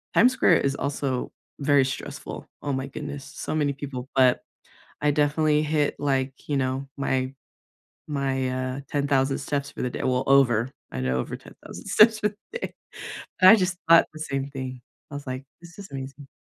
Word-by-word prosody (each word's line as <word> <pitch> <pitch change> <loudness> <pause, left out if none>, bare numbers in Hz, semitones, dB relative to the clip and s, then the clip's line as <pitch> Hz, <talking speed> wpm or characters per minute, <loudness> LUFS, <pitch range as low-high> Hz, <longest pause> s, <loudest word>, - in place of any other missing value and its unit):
Times 250 +3 +6
Square 175 -9 +5
is 140 0 0
also 140 -3 -2 0.3
very 140 -1 +4
stressful, 135 - -6 0.2
oh 145 - -1
my 130 +1 -2
goodness. 140 +1 -6
So - - -5
many 145 -2 +1
people, 135 -2 -6
but 130 -2 +4 0.6
I 150 - +3
definitely 150 +1 +2
hit, 150 -1 +1
like, 135 -2 0 0.2
you 145 - +1
know, 130 +1 -1
my 130 -1 0 0.7
my, 135 -3 -1 0.3
uh, - - -5
10,000 140 -1 +1
steps 140 -1 -2
for - - -7
the 125 - 0
da - - -4
well, 125 0 +1
over. 130 -3 +4 0.2
I 65 - -4
know 65 0 0
over - - -3
10,000 - - -12
steps 220 0 +6
for 210 - +2
the 215 - -10
day. - - -5 0.7
But 185 - +10
I 220 - +11
just 185 -3 0
thought 165 0 +8
the 155 - -10
same 140 -2 -3
thing, 130 -2 -6 0.3
I - - -6
was 145 -1 -7
like, 130 +1 -4 0.2
"This 170 -1 -14
is 195 - -9
amazing." 135 +1 -7
140 Hz, 185 wpm, -25 LUFS, 130-150 Hz, 0.7 s, I